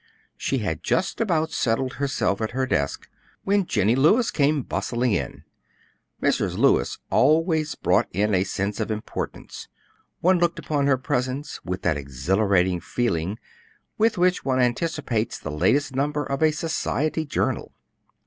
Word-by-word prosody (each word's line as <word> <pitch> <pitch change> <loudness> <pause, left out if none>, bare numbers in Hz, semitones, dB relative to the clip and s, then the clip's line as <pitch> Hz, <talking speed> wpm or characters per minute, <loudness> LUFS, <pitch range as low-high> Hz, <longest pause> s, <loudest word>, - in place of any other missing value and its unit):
She - - -1
had - - -2
just - - 0
about 165 -7 +1
settled 125 -1 0
herself 120 -7 -1
at 110 +1 -2
her 130 - +2
desk 70 - -1 0.4
when 200 -2 +1
Jennie 105 +1 +2
Lewis 185 - +4
came 145 -1 +2
bustling 120 +1 -1
in. 95 - -2 0.8
Mrs. - - 0
Lewis - - +3
always 155 +1 +3
brought 95 +6 +2
in 105 +3 +1
a 95 0 +3
sense 100 +2 -3
of 110 - -2
importance; 110 0 -5 0.5
one 180 +1 +3
looked 175 0 +1
upon 145 -2 -1
her 135 -2 +4
presence 130 +2 -3
with 90 0 -4
that 75 - +1
exhilarating 90 - +1
feeling 95 -1 -1 0.6
with 225 -1 +3
which 180 +1 +2
one 130 -1 +1
anticipates 125 -3 0
the 80 - -6
latest 120 - +1
number 145 +2 0
of 140 +2 -3
a 155 - +5
society 155 0 -1
journal. 145 - -2
130 Hz, 145 wpm, -24 LUFS, 100-155 Hz, 0.8 s, a